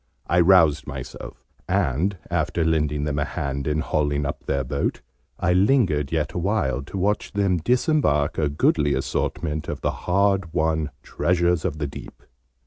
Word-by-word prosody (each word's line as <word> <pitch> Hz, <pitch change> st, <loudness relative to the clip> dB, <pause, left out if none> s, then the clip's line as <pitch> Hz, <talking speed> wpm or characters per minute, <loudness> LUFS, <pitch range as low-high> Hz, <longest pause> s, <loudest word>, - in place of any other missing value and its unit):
I 85 Hz, -, +2 dB
roused 85 Hz, -4 st, +5 dB
myself, 65 Hz, -2 st, -8 dB, 0.3 s
and, 90 Hz, 0 st, +1 dB
after 80 Hz, -1 st, 0 dB
lending 75 Hz, -2 st, +1 dB
them 75 Hz, -1 st, -1 dB
a -, -, +2 dB
hand 70 Hz, 0 st, -3 dB
in 75 Hz, +1 st, 0 dB
hauling 75 Hz, -2 st, 0 dB
up -, -, -4 dB
their 70 Hz, -1 st, 0 dB
boat, 65 Hz, -, -2 dB, 0.4 s
I 90 Hz, 0 st, +2 dB
lingered 90 Hz, -, +2 dB
yet 75 Hz, -3 st, -1 dB
awhile 90 Hz, -, 0 dB
to 95 Hz, -, -7 dB
watch 105 Hz, +3 st, -1 dB
them 100 Hz, -3 st, +1 dB
disembark 120 Hz, -, +1 dB
a 75 Hz, -2 st, +1 dB
goodly 75 Hz, 0 st, +2 dB
assortment 75 Hz, 0 st, -2 dB
of -, -, -5 dB
the -, -, 0 dB
hard 95 Hz, -2 st, 0 dB
won 80 Hz, -1 st, +1 dB
'treasures 85 Hz, -1 st, +1 dB
of 80 Hz, -5 st, -2 dB
the 75 Hz, -, -2 dB
deep.' 70 Hz, -, -10 dB
80 Hz, 155 wpm, -23 LUFS, 75-90 Hz, 0.4 s, roused